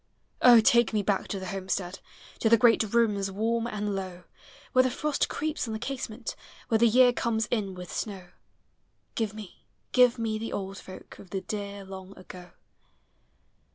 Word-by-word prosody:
O! 240 Hz, -2 st, +8 dB
take 235 Hz, -4 st, +4 dB
me 210 Hz, -1 st, +1 dB
back 200 Hz, -1 st, 0 dB
to 195 Hz, -, -4 dB
the 190 Hz, -, -6 dB
homestead. 190 Hz, -1 st, -3 dB, 0.4 s
To 225 Hz, -, +2 dB
the 230 Hz, -, +7 dB
great 230 Hz, +1 st, +5 dB
rooms 210 Hz, -4 st, +2 dB
warm 225 Hz, +4 st, -1 dB
and 210 Hz, -3 st, -3 dB
low, 185 Hz, -2 st, -6 dB, 0.5 s
Where 255 Hz, -, +6 dB
the 255 Hz, -, +2 dB
frost 290 Hz, +3 st, -1 dB
creeps 310 Hz, -3 st, -2 dB
on 220 Hz, -, -4 dB
the 220 Hz, -, -4 dB
casement, 245 Hz, -3 st, -5 dB, 0.3 s
When 225 Hz, -2 st, +3 dB
the 235 Hz, -, +6 dB
year 245 Hz, +2 st, +5 dB
comes 225 Hz, -2 st, 0 dB
in 200 Hz, -5 st, -1 dB
with 180 Hz, 0 st, -8 dB
snow. 190 Hz, -4 st, -5 dB, 0.8 s
Give 215 Hz, -2 st, -2 dB
me, 210 Hz, -4 st, -11 dB, 0.2 s
give 250 Hz, -1 st, +5 dB
me 220 Hz, -2 st, -2 dB
the 225 Hz, -, -5 dB
old 195 Hz, 0 st, -4 dB
folk 185 Hz, -, -12 dB
Of 190 Hz, -, -13 dB
the 190 Hz, 0 st, -3 dB
dear 200 Hz, -1 st, -6 dB
long 190 Hz, 0 st, -10 dB
ago. 180 Hz, -1 st, -11 dB
215 Hz, 175 wpm, -28 LUFS, 195-235 Hz, 0.8 s, O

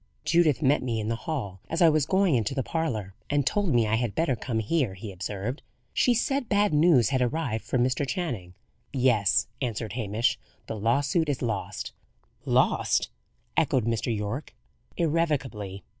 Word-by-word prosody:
"Judith 165 Hz, -3 st, +3 dB
met 140 Hz, +2 st, +4 dB
me 120 Hz, -3 st, -1 dB
in 110 Hz, 0 st, -2 dB
the 115 Hz, -, 0 dB
hall 105 Hz, -12 st, -3 dB
as 165 Hz, -, -1 dB
I 170 Hz, -, +7 dB
was 155 Hz, -2 st, +3 dB
going 190 Hz, -2 st, +3 dB
into 125 Hz, +2 st, 0 dB
the 135 Hz, -, 0 dB
parlour, 115 Hz, -, -2 dB, 0.2 s
and 145 Hz, -1 st, +1 dB
told 205 Hz, 0 st, +1 dB
me 120 Hz, -3 st, +3 dB
I 110 Hz, +1 st, +1 dB
had 120 Hz, -3 st, -2 dB
better 160 Hz, -6 st, +1 dB
come 115 Hz, 0 st, -3 dB
here," 110 Hz, -1 st, 0 dB
he 105 Hz, +2 st, -7 dB
observed. 100 Hz, -, -4 dB, 0.3 s
"She 245 Hz, -, +3 dB
said 270 Hz, +1 st, 0 dB
bad 205 Hz, -3 st, +3 dB
news 150 Hz, -, +5 dB
had 130 Hz, -2 st, +1 dB
arrived 125 Hz, -3 st, -1 dB
for -, -, -1 dB
Mr. 130 Hz, +3 st, +1 dB
Channing." 115 Hz, -, -3 dB, 0.4 s
"Yes," 120 Hz, -7 st, +3 dB, 0.2 s
answered 115 Hz, -4 st, -3 dB
Hamish. 110 Hz, -1 st, 0 dB, 0.3 s
"The 110 Hz, -, -5 dB
lawsuit 140 Hz, -, +1 dB
is 135 Hz, -2 st, -1 dB
lost." 110 Hz, -4 st, -3 dB, 0.5 s
"Lost!" -, -, +2 dB, 0.4 s
echoed 125 Hz, -4 st, +2 dB
Mr. 115 Hz, 0 st, 0 dB
Yorke. 105 Hz, +8 st, -4 dB, 0.4 s
"Irrevocably. 135 Hz, -, -1 dB
125 Hz, 165 wpm, -27 LUFS, 110-155 Hz, 0.5 s, I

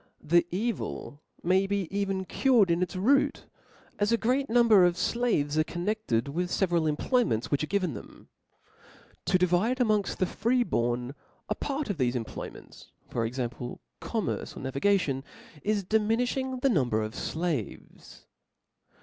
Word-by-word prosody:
The 170 Hz, +2 st, +3 dB
evil 195 Hz, -7 st, -3 dB, 0.2 s
may 190 Hz, +3 st, +3 dB
be 200 Hz, -3 st, -1 dB
even 195 Hz, -1 st, -1 dB
cured 230 Hz, -5 st, +3 dB
in 170 Hz, +1 st, +1 dB
its 180 Hz, +1 st, -2 dB
root: 270 Hz, +10 st, +2 dB, 0.5 s
as 205 Hz, +1 st, +2 dB
a 230 Hz, -, +4 dB
great 260 Hz, +5 st, 0 dB
number 225 Hz, -4 st, +6 dB
of 175 Hz, -1 st, +4 dB
flaves 180 Hz, -8 st, +1 dB
are -, -, +5 dB
connected 175 Hz, -, -1 dB
with 175 Hz, +5 st, -2 dB
the 195 Hz, -, +2 dB
feveral 170 Hz, -3 st, +1 dB
employments 150 Hz, -, 0 dB
which 145 Hz, +1 st, +1 dB
are -, -, -2 dB
given 185 Hz, -5 st, 0 dB
them; 105 Hz, -, -11 dB, 1.0 s
to 185 Hz, -, +3 dB
di 180 Hz, -, +3 dB
vide 185 Hz, +8 st, +1 dB
amopgft 215 Hz, -5 st, +1 dB
the 185 Hz, -, +2 dB
free 245 Hz, +6 st, +1 dB
born 120 Hz, -, -1 dB, 0.4 s
a -, -, +2 dB
part 280 Hz, -4 st, -3 dB
of 195 Hz, -, -5 dB
thefe 125 Hz, -2 st, +1 dB
employ 115 Hz, -3 st, -4 dB
ments, -, -, -15 dB, 0.2 s
for 115 Hz, -2 st, -1 dB
example, 120 Hz, 0 st, -5 dB, 0.2 s
commerce -, -, -3 dB
or -, -, -7 dB
navigation, 140 Hz, 0 st, +1 dB, 0.4 s
is 205 Hz, -2 st, 0 dB
diminiftiing 245 Hz, +5 st, 0 dB
the 275 Hz, -, +3 dB
number 120 Hz, -, +1 dB
of 110 Hz, +1 st, -5 dB
Haves. 160 Hz, -, -5 dB
185 Hz, 155 wpm, -28 LUFS, 145-225 Hz, 1.0 s, number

